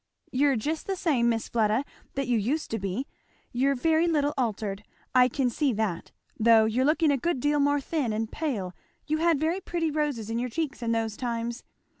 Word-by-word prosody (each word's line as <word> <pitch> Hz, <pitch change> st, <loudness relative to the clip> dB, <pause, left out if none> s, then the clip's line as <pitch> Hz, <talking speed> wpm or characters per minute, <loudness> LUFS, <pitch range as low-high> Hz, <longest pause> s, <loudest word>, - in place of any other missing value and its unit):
"You're 275 Hz, +1 st, +3 dB
just 300 Hz, +8 st, -3 dB
the 390 Hz, -, -1 dB
same, 270 Hz, -10 st, +2 dB
Miss 225 Hz, -1 st, -1 dB
Fleda, 225 Hz, +3 st, +1 dB, 0.3 s
that 275 Hz, -2 st, -1 dB
you 245 Hz, -, +2 dB
used 250 Hz, +9 st, -1 dB
to 225 Hz, -, -1 dB
be 195 Hz, +7 st, -3 dB, 0.5 s
you're 270 Hz, +3 st, +2 dB
very 320 Hz, +5 st, +2 dB
little 295 Hz, -3 st, +1 dB
altered 210 Hz, -5 st, -2 dB, 0.3 s
I 250 Hz, -1 st, +6 dB
can 255 Hz, 0 st, 0 dB
see 275 Hz, +1 st, +1 dB
that 205 Hz, -6 st, -2 dB, 0.3 s
though 225 Hz, 0 st, +6 dB
you're 235 Hz, +4 st, +1 dB
looking 310 Hz, +1 st, +3 dB
a 280 Hz, -, +2 dB
good 305 Hz, +1 st, -1 dB
deal 290 Hz, +3 st, +1 dB
more 285 Hz, 0 st, +3 dB
thin 280 Hz, -4 st, -1 dB
and 220 Hz, +1 st, -2 dB
pale 225 Hz, -, -3 dB, 0.3 s
you 310 Hz, +1 st, 0 dB
had 330 Hz, -3 st, +3 dB
very 330 Hz, +5 st, 0 dB
pretty 335 Hz, -3 st, -1 dB
roses 285 Hz, -8 st, -2 dB
in 230 Hz, -, -1 dB
your 250 Hz, +1 st, -2 dB
cheeks 300 Hz, +1 st, -3 dB
in 230 Hz, -1 st, -1 dB
those 225 Hz, -2 st, -1 dB
times. 235 Hz, 0 st, -3 dB
255 Hz, 200 wpm, -27 LUFS, 225-300 Hz, 0.5 s, I